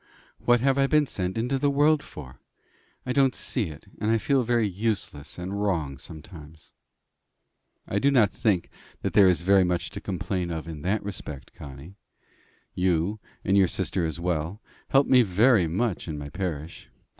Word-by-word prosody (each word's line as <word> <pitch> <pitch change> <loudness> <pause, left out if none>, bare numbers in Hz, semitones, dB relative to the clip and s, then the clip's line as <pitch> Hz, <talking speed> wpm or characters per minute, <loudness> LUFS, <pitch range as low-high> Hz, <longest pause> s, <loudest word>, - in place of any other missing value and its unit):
What 120 -1 +4
have 135 +1 +2
I 135 - +4
been 150 +1 +3
sent 95 -5 -3
into 125 +4 0
the 145 - +2
world 145 +2 +3
for? 65 - -11 0.7
I 125 - -1
don't 135 -1 +3
see 120 -5 -1
it; 75 +4 -11
and 105 - -1
I 115 - +4
feel 130 +5 +2
very 120 -2 +1
useless 95 -7 -3
and 95 +3 -4
wrong 80 -10 -1
sometimes." 80 -1 -12 1.2
"I 100 - 0
do 140 - +3
not 120 -8 +4
think 95 -6 0 0.3
there 100 -2 +5
is 90 -2 +2
very 95 +2 +5
much 90 -1 -1
to - - -7
complain 90 -1 -3
of 80 -3 -4
you 85 - -6
in 75 -2 -8
that 100 +6 0
respect, 85 -8 -7
Connie. 70 +7 -11 0.8
You, 90 +3 0 0.3
and 95 - +3
your 95 -2 +5
sister 90 +1 -1
as 80 0 -3
well, 85 +2 -2 0.3
help 135 +1 +4
me 130 -1 +6
very 105 -1 +4
much 95 +3 -1
in 80 -2 -4
my 70 0 -6
parish. 80 -3 -5
95 Hz, 175 wpm, -26 LUFS, 80-115 Hz, 1.2 s, me